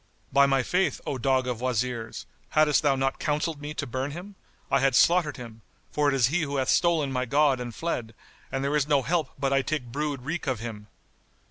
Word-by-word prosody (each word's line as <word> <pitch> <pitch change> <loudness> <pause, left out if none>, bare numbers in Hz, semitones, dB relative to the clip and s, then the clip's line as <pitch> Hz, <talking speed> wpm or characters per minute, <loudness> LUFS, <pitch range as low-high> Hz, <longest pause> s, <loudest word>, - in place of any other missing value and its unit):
By 140 0 +6
my 135 -1 +2
faith, 185 +6 0
O 135 - -3
dog 130 0 +2
of 125 -2 -3
Wazirs, 125 -2 -2 0.2
haddest 150 -2 +3
thou 145 -2 +3
not 135 0 -1
counselled 150 0 -1
me 150 +1 -6
to - - -3
burn 130 +3 -3
him, 180 +7 -8 0.4
I - - +4
had 135 -2 +2
slaughtered 170 -3 +4
him; 115 -3 -10 0.3
for 150 -1 +1
it 140 - +1
is 125 -2 +3
he 170 +4 +1
who 145 -2 -2
hath 130 -1 0
stolen 165 -5 +2
my 125 -1 -1
god 140 0 +3
and 125 -1 -4
fled; 120 -10 -3 0.4
and 135 0 -2
there 140 +2 0
is 150 -1 +1
no 145 -3 +3
help 155 +1 0
but 135 0 0
I 135 - +3
take 135 -4 -3
brood 145 -1 -3
wreak 160 +3 -4
of 130 -4 0
him!" 110 -2 -7
135 Hz, 220 wpm, -26 LUFS, 125-150 Hz, 0.4 s, By